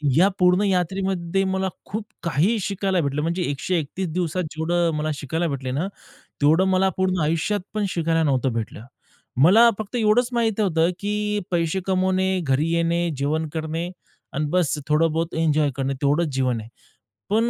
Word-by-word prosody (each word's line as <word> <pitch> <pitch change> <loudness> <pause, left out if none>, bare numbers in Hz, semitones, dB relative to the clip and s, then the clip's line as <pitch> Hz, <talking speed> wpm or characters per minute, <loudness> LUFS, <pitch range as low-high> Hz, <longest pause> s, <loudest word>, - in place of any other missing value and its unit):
या 185 +4 +6
पूर्ण 180 +2 +4
यात्रेमध्ये 190 -1 0
मला 190 0 -1 0.2
खूप 215 +1 -5 0.2
काही 170 +8 +2
शिकायला 195 -2 0
भेटलं. 140 +1 -1
म्हणजे 170 +3 -1
131 170 +4 -2
दिवसात 180 0 -1
जेवढं 170 +1 0
मला 155 +1 -1
शिकायला 160 +5 -2
भेटले 135 -3 -3
ना, 155 +8 -1 0.5
तेवढं 160 +6 +4
मला 190 +1 +3
पूर्ण 185 -1 +1
आयुष्यात 165 +7 0
पण 210 -1 0
शिकायला 165 -1 +1
नव्हतं 130 -4 +1
भेटलं. 115 0 -5 0.6
मला 225 +9 +7
फक्त 215 +3 -5
एवढंच 230 +2 +3
माहीत 225 -3 0
होतं 165 -3 +2
की 210 0 -1
पैसे 170 +2 0
कमवणे, 190 0 +1
घरी 145 +2 +1
येणे, 170 0 +1
जेवण 155 +3 -1
करणे 160 +2 -3 0.4
आणि 150 +1 -1
बस 170 -4 +1
थोडं 155 +1 +3
बहुत 165 +1 -2
एन्जॉय 155 -3 +2
करणे. 135 0 -1
तेवढंच 150 +4 +2
जीवन 130 -3 0
आहे. 110 - -12 0.6
पण 225 +3 +2
170 Hz, 160 wpm, -23 LUFS, 155-190 Hz, 0.6 s, मला